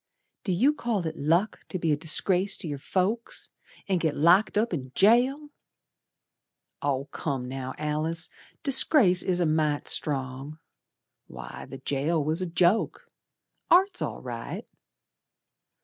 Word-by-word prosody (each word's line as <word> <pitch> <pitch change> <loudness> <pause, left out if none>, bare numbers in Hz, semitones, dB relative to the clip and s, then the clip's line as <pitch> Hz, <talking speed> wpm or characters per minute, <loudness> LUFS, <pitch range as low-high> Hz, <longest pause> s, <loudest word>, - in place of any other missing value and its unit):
"Do 190 - -1
you 245 +12 +3
call 230 - -2
it 160 0 -3
luck 170 +9 +1
to 185 - -3
be 165 -3 0
a - - +4
disgrace 180 +5 +1
to - - -5
your 145 -2 -4
folks, 195 - -2 0.4
And 190 -3 +1
git 160 -3 0
locked 175 +8 +4
up 220 -1 +1
in 130 -5 -4
jail!" 255 +8 +3 1.3
"Oh, 140 -1 -1
come 135 -5 -3
now, 130 0 -5
Alice, 155 +2 -2 0.4
'Disgrace' 255 - +4
is 180 -1 0
a 175 - +2
mite 155 -2 0
strong. 135 +1 -2 0.7
Why, - - -9
the - - -7
jail 150 +3 -1
was 155 +4 -1
a 185 - -1
joke. 175 +5 +1 0.6
Art's 380 +3 +4
all - - -4
right." - - -6
170 Hz, 135 wpm, -27 LUFS, 150-200 Hz, 1.3 s, a